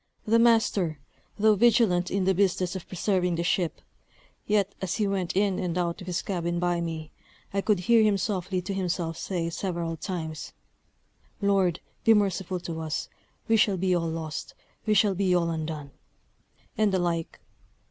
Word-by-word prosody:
The 230 +2 +4
master, 220 -8 +3 0.4
though 215 +1 +5
vigilant 205 -5 +3
in 195 -1 0
the 190 - +4
business 185 -1 +1
of 185 - -6
preserving 180 -1 0
the 170 - -1
ship, 175 -1 0 0.7
yet 205 -2 +2
as 185 -2 -1
he 215 - +1
went 195 -3 -1
in 200 -2 +2
and 180 -1 -2
out 175 +1 -1
of 180 - -9
his 180 -1 -2
cabin 175 -3 -2
by 175 0 0
me, 160 -2 -5 0.4
I 195 - +1
could 205 -3 +1
hear 230 +5 +5
him 210 -2 +3
softly 185 -2 -2
to 195 +2 -3
himself 175 -3 -2
say, 170 -1 -3
several 170 -2 -3
times, 160 -2 -5 0.9
"Lord, 195 -4 +2 0.2
be 225 - +6
merciful 190 -3 0
to 165 -2 -5
us! 160 -1 -3 0.4
we 225 - +4
shall 205 -3 +3
be 185 0 +1
all 165 -2 0
lost; 160 -1 -5 0.3
we 215 - +3
shall 205 0 +4
be 185 -1 +2
all 170 -1 +1
undone!" 155 -3 -4 0.8
and 215 -3 +2
the 190 - +2
like. 170 -2 -2
180 Hz, 170 wpm, -27 LUFS, 170-200 Hz, 0.9 s, be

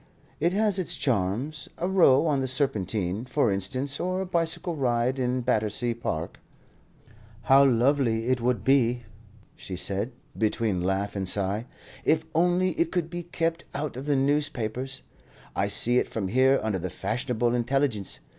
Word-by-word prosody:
"It 170 - +2
has 205 -1 +2
its 180 - -1
charms. 125 +6 -1
A 175 - -1
row 170 -7 +5
on 145 -4 +1
the 130 - -1
Serpentine, 105 - 0
for 130 -3 +1
instance, 130 +9 -1
or 185 +1 -1
a 190 - -2
bicycle 170 0 0
ride 125 -1 0
in 125 0 0
Battersea 115 0 0
Park." 85 -9 -4 1.0
"How 135 +1 +6
lovely 120 -2 +2
it 130 -2 +1
would 120 -4 0
be," 125 -2 +3 0.5
she 95 - -7
said, 100 +6 -2 0.2
between 110 -3 0
laugh 95 +3 -1
and 95 -2 -2
sigh, 100 +4 -1 0.4
"if 160 +1 +2
only 180 +3 +2
it 170 -1 +1
could 175 -2 -2
be 175 0 -4
kept 165 -1 -2
out 145 -1 -3
of 135 +3 -7
the 145 - +2
newspapers! 135 -2 -1 0.5
I 100 - +1
see 120 +4 +3
it - - -1
from 100 -4 -3
here 130 +4 +4
under 105 -3 -1
the 90 +2 -4
Fashionable 120 - -1
Intelligence. 120 -4 0
125 Hz, 155 wpm, -26 LUFS, 110-145 Hz, 1.0 s, How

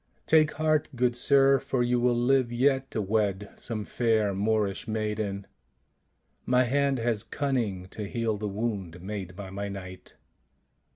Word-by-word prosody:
' - - -41
Take 155 -1 +4
heart, 155 -1 +1
good 120 0 +1
sir, 135 +2 +4
for 125 -1 -1
you 120 0 +1
will 120 0 +2
live 125 0 +2
yet 135 +2 +2
to 110 - -2
wed 100 -1 0
some 110 -3 -4
fair 110 -4 +1
Moorish 105 +1 0
maiden; 105 -2 -2 1.0
my 125 0 +3
hand 140 +2 +1
has 115 -3 0
cunning 120 -11 -2
to 105 - -6
heal 115 -1 -1
the 105 -1 -2
wound 100 -5 -3
made 95 -2 -5
by 95 -1 -8
my 100 +1 -4
knight." 95 -2 -9
110 Hz, 155 wpm, -28 LUFS, 100-125 Hz, 1.0 s, Take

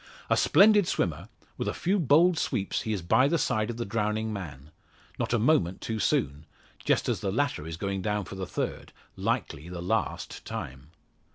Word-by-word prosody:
A - - +6
splendid 205 -2 +5
swimmer, 85 +4 -1 0.3
with - - -2
a - - -1
few 195 +3 +1
bold 165 +4 +5
sweeps 95 - -1
he 110 - -3
is 100 -5 -2
by 130 +10 +4
the 165 +3 +2
side 110 -7 0
of 115 - -4
the 120 - -3
drowning 110 +1 -1
man. 75 -7 -8 0.5
Not - - -1
a 115 - +3
moment 105 - +2
too 110 -1 -3
soon 75 -5 0 0.4
just - - +1
as - - 0
the 100 -3 -2
latter 120 - -1
is 80 0 -6
going 100 +1 -2
down 105 0 -1
for 95 - -9
the 95 -1 -5
third - - -4 0.2
likely 75 +4 -2
the 90 -1 -6
last 90 +2 -2
time. 65 +3 -7
105 Hz, 190 wpm, -28 LUFS, 85-120 Hz, 0.5 s, A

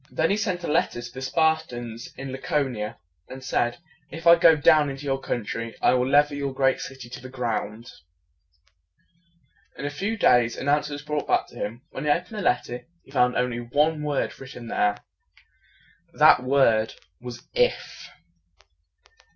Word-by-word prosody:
Then 160 +3 +1
he - - +3
sent 185 -5 -2
a - - -3
letter 150 -5 +1
to 120 0 -8
the 130 - -7
Spartans 130 -6 -1
in 135 0 -6
La 130 - -6
co 145 0 0
ni 120 -5 -6
a, 105 - -5 0.3
and 130 0 -9
said, 120 -1 0 0.3
"If 165 +1 -9
I 170 0 +9
go 165 -1 +6
down 150 -1 +4
into 135 +1 -7
your 135 -1 -1
country, 115 -2 -4
I - - +4
will 125 0 +1
level 145 +1 +4
your 140 -2 -3
great 135 -1 +2
city 135 -2 -8
to 120 - -9
the 130 - -9
ground." 115 -2 -4 1.9
In 140 - -5
a 145 - -2
few 200 +10 -3
days, 120 - +3
an 135 - -5
answer 150 0 +1
was 145 0 -6
brought 150 0 -3
back - - +2
to - - -17
him. 115 +5 -5
When 135 - -6
he - - +1
opened 180 +8 0
the 210 - -3
letter, 120 -5 -1 0.2
he - - -19
found 125 -2 +2
only 125 -1 0
one 150 +6 +1
word 150 -2 -2
written 130 -3 -9
there. 105 -2 +1 1.2
That - - +6
word 125 -4 +2 0.2
was 120 0 -9
"IF." - - -1
135 Hz, 180 wpm, -25 LUFS, 120-150 Hz, 1.9 s, I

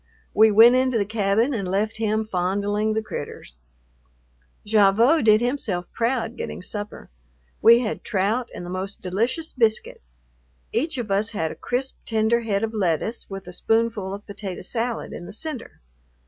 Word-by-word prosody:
We 220 +1 +6
went 225 +3 +8
into 255 -1 +2
the 205 - +1
cabin 215 +5 +1
and 200 -6 -2
left 205 +4 -1
him 220 0 0
fondling 205 +3 0
the 220 - 0
"critters." 145 - -7 1.1
Gavotte 220 +8 +4
did 215 0 +6
himself 235 -8 -1
proud 235 -1 -1
getting 210 - -6
supper. 205 - -6 0.5
We 235 +1 +7
had 225 -3 -3
trout 220 +5 0
and 175 - -6
the 175 - -6
most 190 +1 -5
delicious 230 - -1
biscuit. 225 -4 0 0.7
Each 295 +3 0
of 230 -5 -4
us 210 +3 +1
had 160 -6 -1
a - - -8
crisp, 260 +2 -3
tender 225 +1 +2
head 215 -3 -1
of 225 0 -2
lettuce 205 +3 -1
with 195 -1 -7
a 180 - -9
spoonful 225 -1 0
of 205 - -12
potato 200 -3 -6
salad 230 +4 -3
in 175 - -8
the - - -9
center. 300 - -6
215 Hz, 160 wpm, -23 LUFS, 195-235 Hz, 1.1 s, went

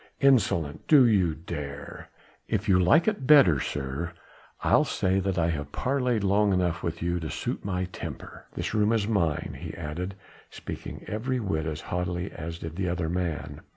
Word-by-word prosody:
"Insolent... 105 - +2
do 145 -5 +7
you 95 -8 +3
dare...?" 75 -4 -7 0.4
"If 110 -1 -1
you 95 -2 +5
like 145 - +4
it 205 -12 0
better, 135 - +7
sir, 75 +6 -3 0.5
I'll - - +5
say 95 +1 +1
that 95 -1 -1
I 85 0 +2
have 75 -2 -4
parleyed 125 - 0
long 100 +1 +3
enough 90 -3 0
with 85 0 -3
you 85 0 0
to 80 -2 -5
suit - - -3
my 95 -2 -1
temper. 90 - -8
This - - -3
room 105 +1 +3
is 110 -3 +1
mine," 90 -9 0
he - - -6
added, 85 +4 -5 0.3
speaking - - -8
every 125 +5 -2
whit 80 -8 -1
as 75 -1 -4
haughtily 90 +1 -3
as 85 +1 -6
did 80 0 -7
the 95 -2 0
other 85 -2 -1
man. 80 -5 -3
90 Hz, 175 wpm, -27 LUFS, 80-105 Hz, 0.5 s, do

